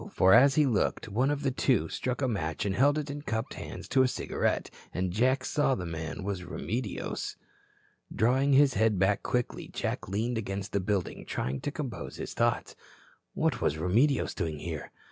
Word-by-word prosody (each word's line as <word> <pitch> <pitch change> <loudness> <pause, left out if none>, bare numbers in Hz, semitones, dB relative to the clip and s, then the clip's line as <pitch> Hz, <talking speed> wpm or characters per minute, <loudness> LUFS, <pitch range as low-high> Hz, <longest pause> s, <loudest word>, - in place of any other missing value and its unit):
For, 95 +1 +5
as 135 +4 +7
he 150 - +5
looked, 115 -3 0
one 125 +7 +1
of 145 0 -1
the 135 - +1
two 130 0 +2
struck 130 +2 -2
a - - +3
match 80 -9 -2
and 100 - 0
held 145 +7 +4
it 150 -2 -3
in 145 +1 -5
cupped 110 -4 -3
hands - - -7
to 130 - +4
a 130 - +5
cigarette, - - -1 0.2
and 90 0 -1
Jack 130 +5 +2
saw 145 -3 +2
the 90 - -4
man 80 +2 -5
was 100 -2 -3
Remedios. 105 +4 -4 0.8
Drawing 130 +5 +3
his 135 0 +6
head 110 -3 +2
back 95 +2 +2
quickly, 125 -1 -2
Jack - - -3
leaned 110 +5 -1
against 100 -1 -4
the 100 - +1
building, 95 -1 -2
trying 65 +2 -2
to 145 - -2
compose 140 -5 -5
his - - -6
thoughts. - - 0 0.6
What - - 0
was 75 - +1
Remedios 115 - +2
doing 80 -5 -3
here? 80 -1 -5
110 Hz, 185 wpm, -29 LUFS, 95-135 Hz, 0.8 s, as